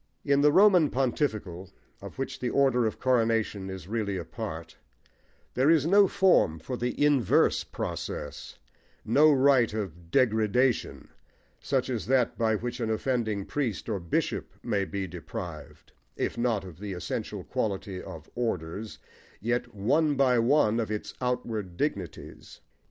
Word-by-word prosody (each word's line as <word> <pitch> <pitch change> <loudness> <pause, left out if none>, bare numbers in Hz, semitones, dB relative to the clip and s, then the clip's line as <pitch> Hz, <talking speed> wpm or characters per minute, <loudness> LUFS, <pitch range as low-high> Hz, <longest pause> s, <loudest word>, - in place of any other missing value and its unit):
In 140 -1 +3
the 150 0 +5
Roman 185 -4 +6
Pontifical, 110 - -2 0.3
of - - -10
which 135 - -4
the 125 - -1
order 130 -4 +3
of 110 - -5
Coronation 115 -6 +1
is 95 -2 -7
really 105 -2 -2
a 85 - -5
part, 80 -8 -7 0.8
there 130 +4 +3
is 160 -3 +4
no 200 +3 +6
form 185 - +3
for 80 +11 -5
the 125 +4 0
inverse 140 -8 +3
process, - - -6 0.5
no 150 +7 +5
rite 130 -5 +4
of 85 -5 -6
"degradation," 120 +1 +1 0.5
such 130 -2 -1
as 120 -4 -3
that 130 -2 +2
by 110 -2 +1
which 120 +3 -4
an 115 -2 -1
offending 110 -3 -1
priest 130 -9 -3
or 105 -4 -2
bishop 85 -2 -2
may 100 -1 0
be 100 0 -4
deprived, 85 -3 -8 0.2
if - - -2
not 120 -4 0
of 90 -3 -11
the 100 -1 -5
essential 90 - -4
quality 95 -2 -3
of 80 -1 -10
"orders," 110 -3 -3 0.4
yet, 120 +1 -2
one 145 +9 +2
by 130 -3 +3
one, 115 -2 +3
of 110 -3 -2
its 105 -1 -4
outward 115 -7 -3
dignities. 95 - -5
115 Hz, 145 wpm, -28 LUFS, 100-130 Hz, 0.8 s, Roman